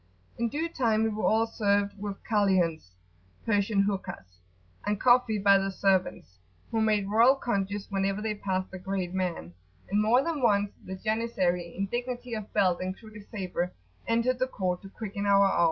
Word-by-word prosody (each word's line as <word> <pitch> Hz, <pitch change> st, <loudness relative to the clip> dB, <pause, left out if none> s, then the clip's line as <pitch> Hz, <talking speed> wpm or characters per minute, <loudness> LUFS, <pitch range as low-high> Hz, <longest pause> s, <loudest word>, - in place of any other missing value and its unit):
In 235 Hz, 0 st, +1 dB
due 310 Hz, +7 st, -2 dB
time 225 Hz, -8 st, +1 dB
we 225 Hz, -, +2 dB
were 215 Hz, 0 st, -2 dB
all 225 Hz, +1 st, +3 dB
served 205 Hz, -2 st, +1 dB
with 200 Hz, -1 st, -4 dB
Kaliuns[FN#26] 185 Hz, -, +1 dB, 0.6 s
(Persian 205 Hz, -1 st, +2 dB
hookahs) 190 Hz, -, -4 dB, 0.4 s
and 205 Hz, -1 st, -1 dB
coffee 245 Hz, -3 st, +4 dB
by 200 Hz, -1 st, +5 dB
the 195 Hz, 0 st, -1 dB
servants, 190 Hz, -, 0 dB, 0.3 s
who 225 Hz, -, +1 dB
made 210 Hz, -2 st, +2 dB
royal 230 Hz, +6 st, +5 dB
conges 205 Hz, -5 st, -2 dB
whenever 195 Hz, 0 st, 0 dB
they 215 Hz, 0 st, -2 dB
passed 190 Hz, -2 st, -3 dB
the 190 Hz, -, -7 dB
great 185 Hz, -1 st, -3 dB
man; 180 Hz, -, -3 dB, 0.4 s
and 205 Hz, +1 st, +3 dB
more 235 Hz, +5 st, +4 dB
than 320 Hz, -3 st, -2 dB
once 205 Hz, -4 st, +2 dB
the 190 Hz, -, -6 dB
janissary, 185 Hz, -5 st, -1 dB
in 195 Hz, -, 0 dB
dignity 245 Hz, +2 st, -4 dB
of 215 Hz, -2 st, -5 dB
belt 185 Hz, -3 st, +2 dB
and 185 Hz, +1 st, -3 dB
crooked 215 Hz, -2 st, -13 dB
sabre, 180 Hz, -3 st, -3 dB, 0.3 s
entered 235 Hz, +2 st, +1 dB
the 255 Hz, -, +1 dB
court 185 Hz, -7 st, -2 dB
to 195 Hz, -, -11 dB
quicken 205 Hz, -1 st, -5 dB
our 200 Hz, 0 st, +5 dB
awe. 195 Hz, -, +1 dB
205 Hz, 175 wpm, -28 LUFS, 190-225 Hz, 0.6 s, by